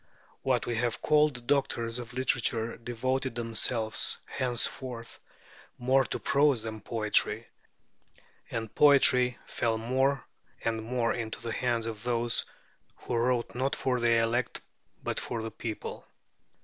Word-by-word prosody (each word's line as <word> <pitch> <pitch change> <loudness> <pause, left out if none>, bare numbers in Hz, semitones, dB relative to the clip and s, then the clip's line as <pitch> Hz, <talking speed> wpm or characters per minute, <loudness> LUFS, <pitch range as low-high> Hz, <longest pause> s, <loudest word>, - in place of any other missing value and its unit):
What 130 -3 +1
we 120 -1 -2
have 120 0 0
called 150 -2 +4
the 125 - -6
doctors 120 -3 0
of 120 0 -8
literature 120 -3 0
devoted 130 +2 -2
themselves 115 -1 0
henceforth 120 -1 -2 0.6
more 130 +2 +3
to - - -3
prose 140 -4 +3
than 110 -1 -5
to - - -24
poetry, 105 -3 +2 1.0
and 115 -2 -4
poetry 125 -4 +6
fell 115 -1 0
more 130 +4 +1 0.4
and 115 -1 0
more 120 0 0
into 115 -2 -4
the 115 -1 -4
hands 120 -3 0
of 110 -2 -5
those 120 0 0 0.5
who 120 - -4
wrote 120 0 +1
not 130 +3 0
for 125 -2 0
the 120 0 +3
elect 115 +2 0 0.4
but - - -1
for 115 -2 -4
the 115 - -4
people. 110 -3 -6
120 Hz, 135 wpm, -29 LUFS, 115-130 Hz, 1.0 s, poetry